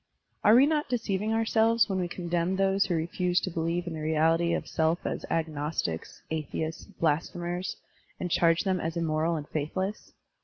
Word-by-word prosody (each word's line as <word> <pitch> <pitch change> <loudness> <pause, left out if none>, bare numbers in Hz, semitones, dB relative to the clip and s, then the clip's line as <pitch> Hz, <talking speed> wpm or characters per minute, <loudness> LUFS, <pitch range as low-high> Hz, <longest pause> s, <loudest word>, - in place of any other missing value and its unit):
Are 210 - +7
we 260 +3 +8
not 300 0 0
deceiving 215 -3 -1
ourselves 225 0 +3
when 190 -2 -1
we 180 - 0
condemn 175 +1 -1
those 195 0 +2
who 175 - 0
refuse 175 +2 0
to 185 - -3
believe 170 +2 -1
in 175 - -4
the 155 - -5
reality 160 +2 +2
of - - -4
self 160 +2 0
as - - -3
agnostics, 150 - -2
atheists, 160 +1 -3
blasphemers, 175 +3 -2 0.4
and 180 - -3
charge 165 0 +3
them 190 -2 +1
as 165 +1 -3
immoral 165 0 +1
and 150 -2 -5
faithless? 185 +7 -3
170 Hz, 165 wpm, -28 LUFS, 160-190 Hz, 0.4 s, we